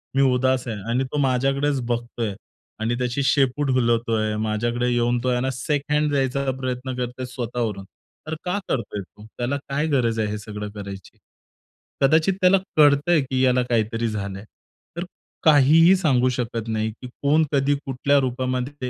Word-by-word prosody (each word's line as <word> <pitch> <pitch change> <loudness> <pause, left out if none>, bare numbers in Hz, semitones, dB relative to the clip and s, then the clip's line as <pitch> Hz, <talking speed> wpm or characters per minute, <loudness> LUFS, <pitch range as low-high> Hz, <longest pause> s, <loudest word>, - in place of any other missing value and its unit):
मी 135 - +4
उदास 130 0 +1
आहे 110 -3 -3
आणि 125 +3 +1
तो - - -2
माझ्याकडेच 135 +1 +1
बघतोय 120 -2 -2 0.5
आणि 115 +2 0
त्याची 125 +2 -1
शेपूट 135 +1 +2
हलवतोय, 115 -3 +1
माझ्याकडे 120 +3 -1
येऊन 120 0 +1
तो 130 - +1
आहे 125 -1 +1
ना 130 - 0
शेक 135 +3 -1
हँड 150 0 +2
जायचा 135 0 0
प्रयत्न 130 0 -3
करतोय 125 +1 -4
स्वतःवरून. 120 -5 -4 0.4
तर 160 - -3
का 180 +3 0
करतोय 105 -4 -2
तो? 105 +2 -15
त्याला 125 +3 -1
काय 150 +3 0
गरज 120 -6 +1
आहे 105 -1 0
हे 105 - -3
सगळं 105 0 -6
करायची? 100 -2 -9 0.8
कदाचित 160 +7 +4
त्याला 185 +1 +6 0.2
कळतंय 150 +2 +5
की 130 -1 -2
याला 125 -1 +3
काहीतरी 115 0 0
झालंय. 100 -2 -5 0.5
तर 175 - -2 0.4
काहीही 160 +4 +6
सांगू 135 -9 +2
शकत 115 -2 -3
नाही 110 0 -1
की 120 +3 -11
कोण, 150 +3 +3
कधी, 140 0 +2
कुठल्या 140 +2 +2
रूपामध्ये 130 +1 -2
125 Hz, 160 wpm, -23 LUFS, 115-140 Hz, 0.8 s, त्याला